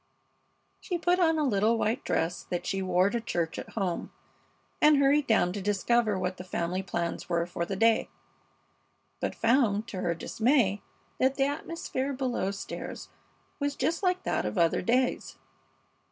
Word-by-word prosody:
She 355 - -3
put 355 +2 +2
on 325 -2 +3
a 305 - +1
little 225 -3 +2
white 225 +5 0
dress 165 +2 -1
that 175 -1 -3
she 195 - -1
wore 185 +1 +2
to 235 0 -1
church 170 -7 -2
at - - -9
home 190 -5 -2 0.7
and 300 -1 +6
hurried 280 +1 +3
down 180 -6 +3
to 200 - -4
discover 210 +2 +1
what 185 0 -2
the - - -7
family 180 0 -2
plans 175 -3 -3
were 170 -1 +1
for 170 -1 -3
the 195 - -2
day, 225 +3 +3 1.1
but - - -2
found, 230 -3 +2
to 185 - -5
her 170 -1 0
dismay, 220 - +1 0.4
that 265 +1 +3
the 270 - +2
atmosphere 280 -2 -3
below 255 -7 -1
stairs 200 0 -6 0.5
was 285 0 -1
just 335 - -1
like 365 -1 +1
that - - 0
of - - -3
other 170 -1 +3
days. 250 +6 0
220 Hz, 165 wpm, -28 LUFS, 185-275 Hz, 1.1 s, and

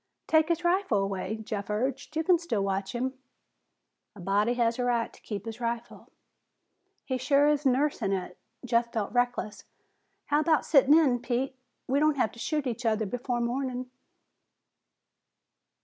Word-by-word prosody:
"Take 315 -1 +3
his 340 0 0
rifle 350 - +2
away," 195 +1 -2
Jeff 205 -2 -5
urged. 265 +7 -2
"You 320 - +1
can 350 0 +4
still 230 - -1
watch 195 +1 -2
him." 260 +2 -3 1.0
"A - - -12
body 205 +6 +1
has 235 -1 +1
the 250 - -1
right 235 -2 0
to - - -18
keep 205 -1 -6
his 225 0 -6
rifle." 235 0 -4 1.0
"He 260 -1 -2
sure 280 +2 +3
is 295 -1 +2
nursing 265 -5 +1
it." 180 -2 -3 0.3
Jeff 235 -1 +1
felt 215 -2 -3
reckless. 245 -4 -1 0.6
"How 295 0 +2
about 310 0 +2
sitting 285 0 +6
in, 265 -7 +3
Pete? 250 +2 -2 0.3
We 270 +2 +2
don't 305 -1 +3
have 220 -5 +1
to 235 - -14
shoot 300 +3 -1
each 245 -1 -3
other 220 -1 +1
before 245 +3 -2
morning." 250 +1 -2
245 Hz, 160 wpm, -28 LUFS, 220-280 Hz, 1.0 s, sitting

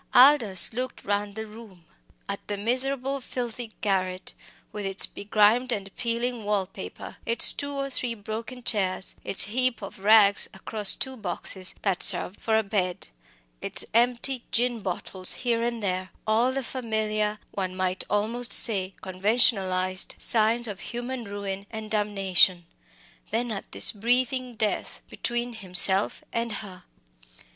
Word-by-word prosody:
Aldous 245 -8 +7
looked 255 +2 -5
round 205 0 -2
the 220 0 -5
room 210 -5 -14 0.4
at 200 0 -4
the 205 - -3
miserable 260 +5 -2
filthy 240 -2 -6
garret 185 -2 -2 0.4
with 210 - -6
its 195 0 +2
begrimed 215 +5 +1
and 195 -3 -5
peeling 235 -1 -2
wall 205 -2 0
paper, 90 - -10
its 230 - +4
two 285 0 -5
or 275 0 -3
three 245 -2 -2
broken 225 +4 -7
chairs, 195 -5 0
its 195 - +4
heap 240 +1 -1
of 195 - -9
rags 205 0 +4
across 205 +1 +5
two 265 -1 -4
boxes 190 -2 -3
that 195 -3 0
served 185 +1 +4
for 220 -1 +1
a 220 - +1
bed; 190 - -3 0.5
its - - -1
empty 245 +2 +1
gin 240 0 +1
bottles 185 -1 -2
here 235 -2 -1
and 235 -2 -3
there 185 -1 -2 0.2
all 225 +4 +2
the 270 0 -3
familiar, 215 -4 -2
one 185 -2 -4
might 185 0 -1
almost 230 +4 -1
say 195 -4 +5
conventionalised, 185 -2 +1
signs 230 +1 +1
of 200 -3 -7
human 240 0 -6
ruin 200 -1 -6
and 220 -1 -8
damnation 195 -4 +2 0.6
then 235 +1 -2
at 195 - -7
this - - +4
breathing 250 +3 -1
death 215 -1 -3
between 240 0 -3
himself 190 -1 +3
and 230 -1 -2
her. 185 -4 -7
215 Hz, 140 wpm, -25 LUFS, 195-240 Hz, 0.6 s, Aldous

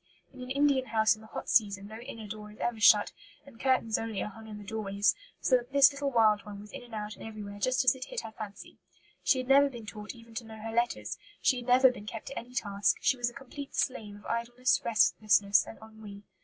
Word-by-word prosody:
In 260 - -11
an 250 - -7
Indian 275 -1 +2
house 220 -1 +3
in 215 - -17
the 220 - -13
hot - - -7
season 200 -3 +2
no 215 +2 -9
inner 230 -3 -8
door 210 0 -8
is 210 - -14
ever 240 -2 -2
shut, 210 -1 +6 0.3
and 265 -5 -16
curtains 255 -4 +2
only 225 -3 -4
are - - -4
hung 220 +2 -12
in 210 -1 -8
the 205 - -10
doorways, 205 -1 +1 0.3
so 255 - +4
that 245 +2 -9
this 280 0 +7
little 280 0 -2
wild 220 -4 +3
one 205 -1 -9
was 210 +1 -12
in - - -8
and 240 -2 -10
out 210 0 -5
and - - -12
everywhere 210 -2 -8
just 255 +3 +1
as 250 - +6
it 260 0 -7
hit - - -4
her 220 - -8
fancy. 215 -2 -9 0.4
She 265 - +3
had 255 -1 -3
never 280 +1 +6
been 240 -4 -9
taught 210 +1 -8
even 230 -1 -15
to 230 +1 -4
know 220 -1 -11
her 225 +1 -6
letters; 235 +1 -1 0.2
she 260 - +2
had 245 0 -7
never 255 +1 +6
been 210 -4 -11
kept 220 0 -6
to 275 - -4
any 245 +2 -13
task; 200 -3 +1
she - - +2
was 240 -1 -1
a - - -15
complete 275 +1 -9
slave 215 -5 -1
of 205 - -15
idleness, 240 +2 0
restlessness, 205 -3 +3
and - - -9
ennui. 215 -2 -11
225 Hz, 250 wpm, -30 LUFS, 210-255 Hz, 0.4 s, this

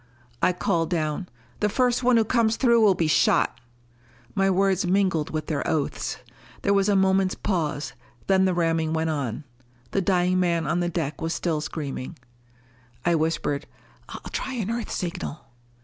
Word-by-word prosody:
I - - +4
called 170 -2 0
down, 160 +1 -2 0.3
"The 210 - +2
first 250 +2 +1
one 250 -1 +4
who 225 - +5
comes 225 -1 +2
through 235 -2 +4
will 205 -3 +5
be 165 - 0
shot!" 155 - +2 0.7
My 195 -1 +2
words 195 0 +2
mingled 185 -4 +1
with 155 -1 -3
their 150 -2 -2
oaths. 150 -3 -1 0.5
There 200 - +3
was 200 0 +3
a 205 - +3
moment's 190 0 +3
pause, 155 -7 -2 0.3
then 190 -1 +3
the 185 -1 +1
ramming 165 -2 +1
went 160 0 0
on. 140 -3 -3 0.5
The 195 - +1
dying 180 -1 +2
man 170 -3 +1
on 175 - 0
the 175 0 0
deck 160 -4 -3
was 165 +1 -1
still 160 -4 -1
screaming. 150 -1 -5 0.9
I 175 - +3
whispered, 160 -3 -1 0.4
"I'll - - -8
try 265 - -3
an 225 -4 -2
Earth 235 -1 -3
signal." 170 -3 -4
180 Hz, 165 wpm, -25 LUFS, 160-195 Hz, 0.9 s, who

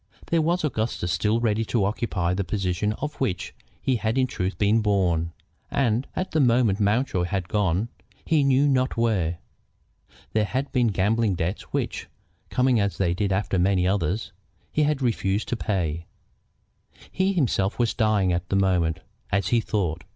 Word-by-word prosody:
There 165 -1 +4
was 170 +2 +1
Augustus 110 - -1
still 105 +8 +1
ready 115 -1 +1
to 110 -3 +1
occupy 100 -4 -1
the 100 +2 -1
position 95 +1 -1
to 110 - -3
which 95 -10 -2 0.3
he 130 -2 +1
had 110 +2 -1
in 130 - +4
truth 95 -5 -3
been 105 +2 +3
born. 90 -6 +1 0.4
And 125 -1 +1
at 185 - -2
the 160 - +1
moment 120 -6 +3
Mountjoy 105 -3 +1
had 95 -1 -2
gone 100 0 +1 0.4
he 155 -3 +3
knew 140 +1 +4
not 130 -2 +1
where. 95 -8 +1 1.0
There 110 -1 +2
had 130 +6 -2
been 125 -2 +2
gambling 105 +1 +1
debts 85 +4 -2
which, - - -2 0.4
coming 125 -2 +2
as 100 -1 0
they 90 -3 +1
did 100 +2 -1
after 95 -1 0
many 90 0 +2
others, 95 +2 -1 0.4
he 155 - +1
had 145 -2 +1
refused 105 -4 0
to - - 0
pay. 85 -7 -2 1.0
He 190 +1 +1
himself 115 - +1
was 120 -2 +1
dying 105 -4 +2
at 85 +1 -3
the - - 0
moment, 90 -4 +1 0.3
as 100 -3 +1
he 120 - +3
thought. 90 -6 -1
105 Hz, 165 wpm, -25 LUFS, 95-120 Hz, 1.0 s, There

